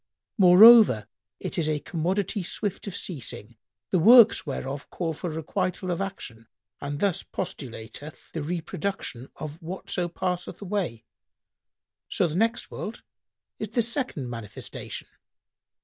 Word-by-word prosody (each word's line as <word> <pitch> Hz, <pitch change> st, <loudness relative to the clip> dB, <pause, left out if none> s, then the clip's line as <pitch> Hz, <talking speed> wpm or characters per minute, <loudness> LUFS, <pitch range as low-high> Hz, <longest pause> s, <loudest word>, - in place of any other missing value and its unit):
Moreover, 195 Hz, -, +8 dB, 0.3 s
it -, -, -3 dB
is 155 Hz, -2 st, +1 dB
a 150 Hz, -1 st, 0 dB
commodity 185 Hz, +7 st, -1 dB
swift 195 Hz, +3 st, -3 dB
of 190 Hz, -, -4 dB
ceasing, 120 Hz, -, -4 dB, 0.4 s
the 185 Hz, -, +3 dB
works 230 Hz, 0 st, +7 dB
whereof 135 Hz, 0 st, -5 dB
call 165 Hz, -3 st, -3 dB
for 175 Hz, +3 st, -5 dB
requital 180 Hz, +3 st, -2 dB
of 175 Hz, -, -2 dB
action 120 Hz, -, -6 dB, 0.3 s
and 145 Hz, 0 st, -4 dB
this 195 Hz, -1 st, +1 dB
postulateth 135 Hz, -3 st, -7 dB
the 160 Hz, -, -4 dB
reproduction[FN#101] 155 Hz, -4 st, -4 dB
of 155 Hz, +3 st, -7 dB
whatso 175 Hz, +1 st, -3 dB
passeth 180 Hz, +1 st, -3 dB
away; 180 Hz, -, -3 dB, 1.0 s
so -, -, +1 dB
the 155 Hz, -, -5 dB
next 225 Hz, +6 st, 0 dB
world 220 Hz, -, -6 dB, 0.6 s
is 215 Hz, -, -4 dB
the 235 Hz, +2 st, +2 dB
second 235 Hz, -, -2 dB
manifestation." 115 Hz, -4 st, -7 dB
175 Hz, 125 wpm, -26 LUFS, 145-195 Hz, 1.0 s, Moreover